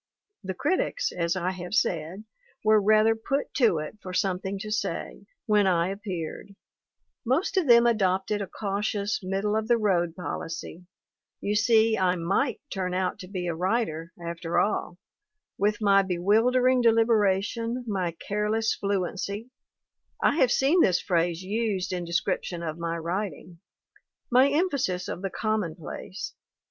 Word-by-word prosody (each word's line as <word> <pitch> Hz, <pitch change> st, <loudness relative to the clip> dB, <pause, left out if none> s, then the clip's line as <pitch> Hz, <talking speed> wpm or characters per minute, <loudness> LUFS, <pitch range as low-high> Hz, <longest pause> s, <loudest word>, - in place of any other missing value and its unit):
The 190 Hz, -1 st, -4 dB
critics, 375 Hz, -, 0 dB
as 170 Hz, 0 st, -1 dB
I 185 Hz, 0 st, -1 dB
have 185 Hz, +2 st, -5 dB
said, 170 Hz, +3 st, -1 dB, 0.4 s
were 215 Hz, 0 st, +5 dB
rather 215 Hz, +2 st, +4 dB
put 275 Hz, +6 st, -2 dB
to 235 Hz, -, +3 dB
it 155 Hz, +8 st, -6 dB
for 185 Hz, -, -7 dB
something 190 Hz, +1 st, -1 dB
to 210 Hz, +2 st, -6 dB
say, 215 Hz, -, -3 dB, 0.2 s
when 210 Hz, -4 st, +3 dB
I 175 Hz, -1 st, +2 dB
appeared; 195 Hz, -1 st, -6 dB, 0.7 s
most 285 Hz, -, 0 dB
of 370 Hz, -6 st, +2 dB
them 235 Hz, -1 st, +7 dB
adopted 205 Hz, -2 st, +1 dB
a 200 Hz, -, -3 dB
cautious, 205 Hz, +1 st, -2 dB
middle 195 Hz, +3 st, -1 dB
of 220 Hz, 0 st, -1 dB
the 240 Hz, 0 st, +4 dB
road 175 Hz, -6 st, +1 dB
policy; 170 Hz, +1 st, -6 dB, 0.5 s
you 205 Hz, -, -1 dB
see 220 Hz, 0 st, +3 dB
I 185 Hz, -1 st, +2 dB
might 185 Hz, +10 st, 0 dB
turn 185 Hz, -2 st, -2 dB
out 185 Hz, 0 st, -1 dB
to 185 Hz, -, -8 dB
be 185 Hz, -2 st, -4 dB
a 170 Hz, -, -1 dB
writer 170 Hz, -2 st, -1 dB
after 170 Hz, 0 st, -4 dB
all, 195 Hz, -3 st, 0 dB, 0.6 s
with 210 Hz, +2 st, +1 dB
my 200 Hz, -1 st, +5 dB
bewildering 225 Hz, +8 st, +3 dB
deliberation, 230 Hz, +1 st, +2 dB
my 185 Hz, -5 st, -1 dB
'careless 210 Hz, +5 st, -1 dB
fluency' 200 Hz, +3 st, -3 dB, 0.7 s
I 285 Hz, -, +2 dB
have 255 Hz, -6 st, +4 dB
seen 295 Hz, +9 st, +4 dB
this 185 Hz, -, +4 dB
phrase 170 Hz, -1 st, 0 dB
used 200 Hz, -2 st, -1 dB
in 175 Hz, -1 st, -3 dB
description 170 Hz, 0 st, -2 dB
of 155 Hz, -2 st, -3 dB
my 170 Hz, 0 st, -2 dB
writing 175 Hz, 0 st, -4 dB, 0.7 s
my 255 Hz, +3 st, +6 dB
emphasis 280 Hz, -, 0 dB
of -, -, -5 dB
the 195 Hz, -, -2 dB
commonplace. 190 Hz, -2 st, -4 dB
200 Hz, 145 wpm, -26 LUFS, 180-220 Hz, 0.7 s, them